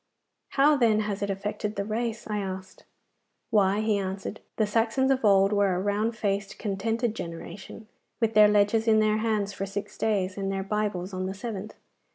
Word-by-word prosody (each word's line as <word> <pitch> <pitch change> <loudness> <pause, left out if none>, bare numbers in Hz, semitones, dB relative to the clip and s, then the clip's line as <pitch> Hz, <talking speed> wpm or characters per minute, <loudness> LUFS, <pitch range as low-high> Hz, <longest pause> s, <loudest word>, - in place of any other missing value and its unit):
'How, 290 +2 +5
then, 220 -4 +3
has 210 -1 -3
it 200 - -1
affected 210 +2 -3
the 200 - -2
race?' 225 +1 -3
I 210 -1 -2
asked. 190 -1 -6 0.7
'Why,' 200 0 +3
he 215 -2 +1
answered, 195 +2 -4 0.2
'the 215 - +2
Saxons 230 +5 +1
of 265 -2 +1
old 195 -1 +5
were 200 -2 +2
a - - -1
round 210 +3 0
faced, 200 -1 -2
contented 225 +3 -1
generation, 195 +4 -8 0.3
with 225 -2 +1
their 210 -1 +8
ledgers 210 +2 +3
in 220 -1 +5
their 215 0 +3
hands 215 -2 0
for 195 - -4
six 195 +1 -6
days 195 -4 0
and 195 0 -1
their 195 0 -2
bibles 200 -2 -2
on 185 0 -2
the 190 - -4
seventh. 210 -1 -6
210 Hz, 185 wpm, -27 LUFS, 195-220 Hz, 0.7 s, their